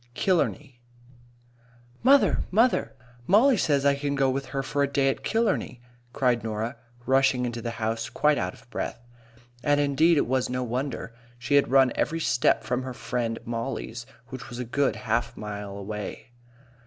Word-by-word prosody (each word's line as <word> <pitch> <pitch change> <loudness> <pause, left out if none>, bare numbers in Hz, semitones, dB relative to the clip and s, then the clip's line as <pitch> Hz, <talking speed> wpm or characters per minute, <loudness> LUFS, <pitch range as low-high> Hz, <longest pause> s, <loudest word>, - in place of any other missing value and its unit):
KILLARNEY 145 -8 0 1.2
"MOTHER, 260 -5 +4
mother! 230 +6 +2 0.3
Mollie 240 +8 +5
says 145 -8 +1 0.2
can 140 0 -1
I - - -1
go 135 -1 +2
with 135 +1 -3
her 135 0 -3
for 145 +1 -1
a 140 - +3
day 140 -1 +2
at 135 - -3
Killarney?" 215 - 0 0.3
cried 125 -3 +1
Norah, 110 +1 -3 0.3
rushing 130 -1 +3
into 120 -1 -4
the 120 - -3
house 115 0 -2
quite 150 -1 +2
out 90 -1 -3
of - - -20
breath. - - -4 0.6
And, 145 +2 +3
indeed, 150 +4 +3
it - - +3
was 130 +1 0
no 125 0 -2
wonder. 125 0 -4 0.2
She 120 +4 -3
had 140 -3 +4
run 135 -1 +5
every 165 +2 -1
step 120 -8 +2
from 125 +3 -1
her 130 -1 -6
friend 115 -2 -2
Mollie's, 120 0 -4 0.2
which 130 -3 -8
was 120 - -7
a 125 - -4
good 140 +3 0
half 115 +2 -2
mile 105 -1 -6
away. 105 +4 -6
130 Hz, 165 wpm, -26 LUFS, 115-145 Hz, 1.2 s, Mollie